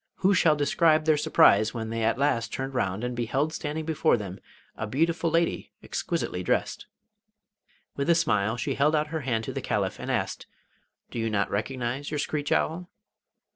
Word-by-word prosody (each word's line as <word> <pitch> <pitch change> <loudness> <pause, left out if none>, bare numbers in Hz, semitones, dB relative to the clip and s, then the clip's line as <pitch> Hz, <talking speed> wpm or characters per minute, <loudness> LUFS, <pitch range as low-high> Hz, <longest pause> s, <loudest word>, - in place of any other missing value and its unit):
Who 195 +2 +2
shall 165 -4 +4
describe 155 +2 +3
their 155 -1 +4
surprise 110 -7 +4
when 110 -1 -4
they 115 0 -2
at 115 +1 +2
last 130 -4 0
turned 135 0 -4
round 100 -3 -1
and 125 0 -2
beheld 135 +6 -1
standing 155 0 -4
before 160 -4 +2
them 100 -3 -7 0.4
a 110 - -4
beautiful 165 +7 +1
lady 165 +1 0
exquisitely 165 - -3
dressed! - - -1 1.1
With 140 +3 -2
a 170 - +6
smile 110 -9 +1
she 115 - -2
held 150 +3 +2
out 150 0 0
her 160 0 -3
hand 115 -4 -1
to - - -5
the - - -3
Caliph, - - -1
and - - -6
asked: - - -2 0.6
'Do - - -4
you 115 0 0
not 100 -2 0
recognise 125 +5 -3
your 150 - -3
screech 145 0 -2
owl? 175 +3 0
140 Hz, 180 wpm, -27 LUFS, 115-155 Hz, 1.1 s, a